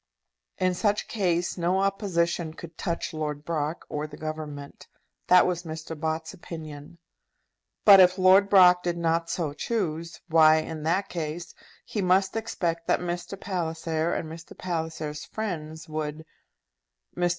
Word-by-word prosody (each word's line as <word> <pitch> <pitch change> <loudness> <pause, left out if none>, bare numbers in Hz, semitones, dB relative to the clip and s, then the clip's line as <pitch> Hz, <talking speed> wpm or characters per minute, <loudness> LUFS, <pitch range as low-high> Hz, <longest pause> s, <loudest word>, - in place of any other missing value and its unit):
In 185 0 +1
such 205 +3 0
case 180 -4 0
no 175 +3 +1
opposition 170 -5 0
could 170 -1 -10
touch 170 -2 -3
Lord 150 -1 -4
Brock 160 0 -2
or 150 +1 -3
the 150 -1 -11
Government. 155 -2 -7 0.4
That 180 0 +7
was 175 -1 -1
Mr. 160 -1 -7
Bott's 160 +2 -3
opinion. 160 -3 -9 0.9
But 200 -2 +10
if 185 0 +6
Lord 190 +2 +6
Brock 180 -2 +7
did 175 -1 -2
not 165 0 0
so 160 -5 -2
choose, 170 -3 -3
why, 160 -2 +6
in 160 0 -3
that 175 +6 0
case, 165 0 -5 0.3
he 210 - -3
must 190 +2 +2
expect 170 -7 -2
that - - +3
Mr. 175 +2 -4
Palliser, 165 -3 -2
and 160 - -3
Mr. 165 +1 -10
Palliser's 160 -3 -4
friends, 160 -7 -5
would. 155 0 -4 0.9
Mr. 175 0 +1
170 Hz, 140 wpm, -26 LUFS, 155-180 Hz, 0.9 s, But